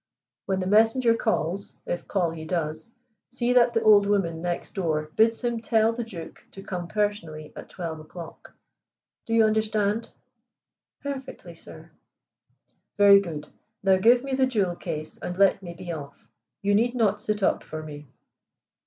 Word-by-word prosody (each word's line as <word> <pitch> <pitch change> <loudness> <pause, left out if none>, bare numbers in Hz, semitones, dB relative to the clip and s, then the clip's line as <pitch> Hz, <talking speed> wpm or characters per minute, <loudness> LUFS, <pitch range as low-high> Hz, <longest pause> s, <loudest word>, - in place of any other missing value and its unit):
When 190 -1 0
the - - -2
messenger 225 +4 +4
calls, 200 -4 -2
if 175 - -4
call 180 -5 0
he 160 -1 -7
does, 160 0 -3 0.4
see 245 0 0
that 240 -1 +4
the 225 - +2
old 205 -2 +6
woman 175 -5 0
next 175 0 -3
door 155 -5 -2
bids 225 +1 +3
him 240 -1 -1
tell 225 0 +2
the 240 +1 -3
Duke 180 -8 -10
to 195 - -10
come 180 -3 -5
personally 170 -6 -3
at - - -10
twelve 165 -3 -6
o'clock. 160 +2 -11 0.8
Do 225 - 0
you 225 - +6
understand?" 215 0 0 0.9
"Perfectly, 275 -2 -7
sir." - - -13 1.1
"Very 200 -1 +8
good. 160 -6 -6 0.3
Now 190 -1 +5
give 240 +6 +5
me 275 -1 -4
the 260 0 +3
jewel 200 -8 0
case, 155 -3 -6
and 180 - -5
let 195 0 +4
me 175 -2 -8
be 175 0 -7
off. 145 -4 -9 0.4
You 205 0 +2
need 240 +4 +2
not 210 -4 +1
sit 210 -1 -2
up - - +2
for 155 0 -7
me." 150 -1 -9
200 Hz, 160 wpm, -26 LUFS, 170-225 Hz, 1.1 s, Very